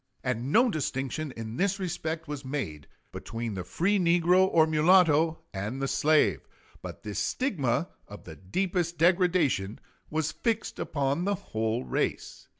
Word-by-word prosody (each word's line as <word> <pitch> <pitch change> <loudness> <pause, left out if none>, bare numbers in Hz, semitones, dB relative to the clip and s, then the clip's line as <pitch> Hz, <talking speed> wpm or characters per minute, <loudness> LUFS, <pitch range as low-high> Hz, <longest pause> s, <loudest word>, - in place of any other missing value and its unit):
And 125 +1 -2
no 240 +5 +4
distinction 140 -1 -3
in 115 +1 -6
this 195 0 0
respect 165 -3 -4
was 145 -1 -5
made 130 - -5 0.2
between 115 -1 -5
the 95 -2 -4
free 195 - 0
negro 175 +2 +4
or 160 -1 +5
mulatto 160 0 +4
and 105 +7 -4
the 135 - -1
slave, 150 +3 +2 0.4
but - - -9
this 105 -1 -4
stigma, 155 - 0 0.2
of 105 - -11
the 80 - -10
deepest 175 - -2
degradation, 170 - +2 0.3
was 155 0 -1
fixed 225 -2 -2
upon 140 +4 -1
the 200 0 +1
whole 115 - -2
race. - - -3
155 Hz, 145 wpm, -28 LUFS, 120-180 Hz, 0.4 s, or